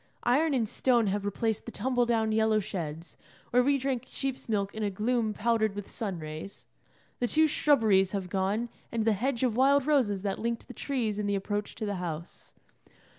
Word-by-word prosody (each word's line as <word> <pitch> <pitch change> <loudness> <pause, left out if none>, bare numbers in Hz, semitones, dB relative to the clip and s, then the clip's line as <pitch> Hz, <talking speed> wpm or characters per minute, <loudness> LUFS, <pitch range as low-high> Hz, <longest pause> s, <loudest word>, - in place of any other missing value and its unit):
Iron 285 +5 +3
and 230 -4 +1
stone 240 0 +2
have 205 0 -2
replaced 220 +3 -1
the - - -4
tumble 245 -1 0
down 225 -2 +1
yellow 220 0 +3
sheds, 170 -5 -5 0.3
where 250 - +5
we 280 +2 +3
drank 260 -2 -2
sheep's 270 -3 -4
milk 200 -2 0
in 220 - -5
a 210 - +1
gloom 220 +3 0
powdered 220 -1 +1
with 205 -1 -7
sun 200 -5 -4
rays; 155 +4 -8 0.5
the 245 - +1
two 315 +5 +4
shrubberies 220 -11 +3
have 195 -3 -3
gone, 200 +5 -1 0.2
and 230 -2 -1
the 225 - +4
hedge 240 +4 -1
of 240 -4 +1
wild 275 +2 +4
roses 240 -10 +2
that 195 -2 -2
linked 235 0 -3
the 250 - -9
trees 230 -6 -2
in 210 - -1
the 200 - +1
approach 205 +1 -3
to 220 - -4
the 205 -2 -2
house. 170 -1 -7
220 Hz, 195 wpm, -29 LUFS, 200-250 Hz, 0.5 s, where